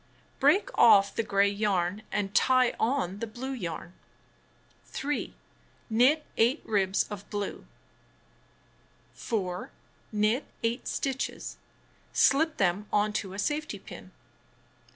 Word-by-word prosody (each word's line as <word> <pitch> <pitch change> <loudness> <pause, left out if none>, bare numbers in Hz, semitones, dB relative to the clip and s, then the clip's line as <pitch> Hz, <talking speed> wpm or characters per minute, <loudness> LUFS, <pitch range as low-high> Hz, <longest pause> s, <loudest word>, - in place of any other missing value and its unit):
Break 425 +6 +3
off 200 -3 +7
the - - 0
gray 200 -2 +2
yam 200 -2 0
and 205 -1 -2
tie 255 +1 +4
on 225 -6 0
the 230 - -3
blue 245 +5 -6
yam.. 175 -7 -5 0.9
3. 290 +2 -3 0.6
Knit 260 +8 +4
8 240 +7 +3
ribs 195 -2 +1
of 205 -1 -8
blue. 205 -2 -4 1.5
4. 185 -5 -3 0.4
Knit 215 +5 +1 0.2
8 230 +3 -1
stitches. 265 -1 -3 0.6
Slip 315 +3 +3
them 195 +2 +1
on 210 0 +2
to 190 -2 -3
a - - -7
safety 295 +1 -2
pin. 190 -1 -12
215 Hz, 110 wpm, -28 LUFS, 200-260 Hz, 1.5 s, off